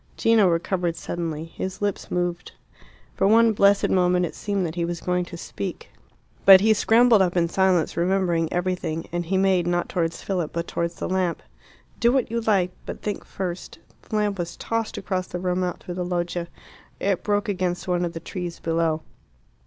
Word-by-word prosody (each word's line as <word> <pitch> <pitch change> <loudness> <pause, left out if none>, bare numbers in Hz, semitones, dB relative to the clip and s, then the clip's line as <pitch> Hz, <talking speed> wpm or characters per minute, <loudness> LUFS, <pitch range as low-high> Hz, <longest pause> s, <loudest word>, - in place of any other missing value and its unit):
Gino 225 -3 +4
recovered 175 0 0
suddenly. 165 -3 -4
His 185 +3 -6
lips 205 -2 -2
moved. 175 0 -2 0.6
For 195 - +2
one 225 +1 +5
blessed 200 -1 +4
moment 180 -1 +3
it 165 - -6
seemed 200 -3 -2
that 160 - -4
he 175 0 -2
was 170 0 -3
going 180 0 -1
to 175 0 -9
speak. 100 -10 -6 0.5
But 195 -1 +10
he 220 +3 +4
scrambled 225 +1 +5
up 180 -1 +1
in 170 -1 +3
silence, 185 -2 +2
remembering 175 -2 +1
everything, 175 -3 -2
and 175 -1 -3
he 190 +2 +1
made 190 -2 +2
not 175 0 0
towards 165 -2 -2
Philip, 180 -5 -2
but 170 0 -3
towards 170 0 -2
the - - -4
lamp. 185 -2 -1 0.6
"Do 235 0 +4
what 255 -3 +1
you 235 0 -1
like; 195 -5 +2 0.2
but - - -7
think 205 -1 -3
first 180 -2 -6 0.2
" - - -36
The - - -3
lamp 205 -2 0
was 170 -1 -4
tossed 230 -1 -2
across 185 -2 -2
the - - -5
room, 180 0 0
out 180 -1 -4
through 175 - -6
the 180 0 -3
loggia. 175 -1 -2 0.5
It 195 -2 0
broke 205 0 0
against 185 -3 -2
one 180 -1 +1
of 170 -1 -2
the 165 - -5
trees 175 +1 -6
below. 165 -1 0
180 Hz, 190 wpm, -24 LUFS, 170-195 Hz, 0.6 s, But